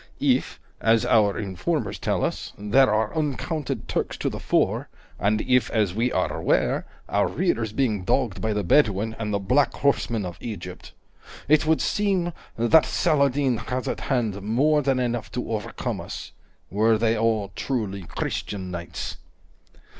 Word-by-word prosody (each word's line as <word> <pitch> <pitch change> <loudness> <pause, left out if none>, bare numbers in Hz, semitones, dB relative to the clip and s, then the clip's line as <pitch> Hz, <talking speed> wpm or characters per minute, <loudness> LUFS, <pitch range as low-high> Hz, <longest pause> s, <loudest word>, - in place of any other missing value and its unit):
If, - - +1 0.2
as 115 0 +3
our 105 -3 +3
informers 95 -4 -2
tell - - 0
us, - - -4
there 105 +4 +4
are 110 +5 0
uncounted 150 0 -2
Turks - - -2
to - - -1
the - - -6
fore, - - +1 0.3
and 105 +2 +2
if, 125 -3 +2
as 105 -5 +1
we 120 +4 0
are - - 0
aware, - - +1 0.2
our - - +2
rear 115 - 0
is 110 -2 -2
being 110 -5 0
dogged 110 0 0
by 110 - 0
the 105 0 -1
Bedouin 110 0 +2
and 105 -1 -2
the 100 - +1
black 125 +8 +2
horsemen 120 -7 0
of 90 -1 -7
Egypt, 90 -5 -7 0.5
it 155 +1 +4
would 160 0 +3
seem 190 -4 0 0.2
that 120 +8 +5
Saladin 140 -5 +2
has 125 +3 -4
at - - -2
hand 115 -7 -1
more 140 +9 +2
than 135 -2 +1
enough 120 -3 -2
to 125 -1 -3
overcome 105 -2 -3
us, - - -7 0.4
were 110 +2 +3
they 115 +1 +2
all 110 -3 0
truly 105 -7 -2
Christian 95 +2 -4
knights." 85 -1 -5
115 Hz, 160 wpm, -25 LUFS, 105-135 Hz, 0.5 s, that